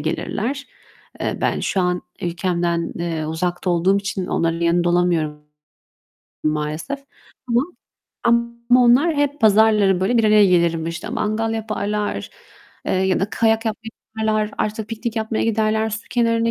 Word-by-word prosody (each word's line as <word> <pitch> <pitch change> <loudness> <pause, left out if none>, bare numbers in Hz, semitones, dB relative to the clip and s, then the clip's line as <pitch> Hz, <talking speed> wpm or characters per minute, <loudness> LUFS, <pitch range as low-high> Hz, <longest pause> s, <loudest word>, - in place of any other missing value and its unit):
gelirler. 230 - -3 0.5
Eee, - - -2
ben - - 0
şu 195 - 0
an 180 0 0 0.2
ülkemden, 175 -1 -1
eee, 165 -2 -3
uzakta 175 +3 -2
olduğum 175 +3 +3
için 195 -2 -3
onların 165 0 0
yanında 170 +1 +2
olamıyorum 170 -4 +1 1.0
maalesef. 155 - -2 0.5
Ama 240 +2 +3 0.6
ama 235 +1 +2
onlar 280 +8 +4
hep 285 -1 0
pazarları 210 -3 +4
böyle 225 +6 +2
bir 225 - +3
araya 210 -1 +6
gelirim 170 -3 +2
işte, 165 +1 -5
mangal 225 +1 -1
yaparlar, 210 -1 -3 0.6
eee - - 0
ya 185 0 +1
da 200 - -1
kayak 225 0 +2
yapmaya 220 +1 -4 0.3
giderler, 215 -1 0
artı 215 0 -2
piknik 225 +1 -5
yapmaya 220 0 -1
giderler, 220 0 +1
su 220 +1 -6
kenarına 230 -1 +2
210 Hz, 140 wpm, -21 LUFS, 175-225 Hz, 1.0 s, araya